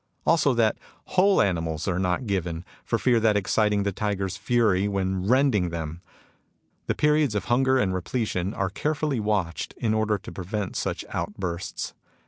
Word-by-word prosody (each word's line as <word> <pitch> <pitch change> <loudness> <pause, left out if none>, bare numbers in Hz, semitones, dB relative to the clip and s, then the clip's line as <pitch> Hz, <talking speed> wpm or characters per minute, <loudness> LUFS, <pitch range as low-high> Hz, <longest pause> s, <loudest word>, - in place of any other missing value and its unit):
Also, 150 -5 +3
that 115 -2 +2 0.3
whole 195 +2 +5
animals 80 -4 -1
are 90 -2 0
not 90 +6 0
given, 90 -4 -2 0.2
for 115 - 0
fear 120 +3 +3
of 110 - 0
exciting 105 0 +2
the 100 - 0
tiger's 100 -1 -2
fury 105 -2 +2
when 95 -1 -1
rending 125 -7 +3
them? 85 0 -5 0.9
The - - 0
periods 150 -5 +2
of 100 - -1
hunger 130 +2 +3
and 95 -7 +1
repletion 95 -1 -2
are 95 -1 -1
carefully 150 +1 -1
watched 105 -6 -1
in 110 -2 0
order 110 -1 +1
to - - -10
prevent 95 +1 -4
such - - -2
out 85 +5 -3
bursts. 90 -3 -4
105 Hz, 160 wpm, -25 LUFS, 90-120 Hz, 0.9 s, whole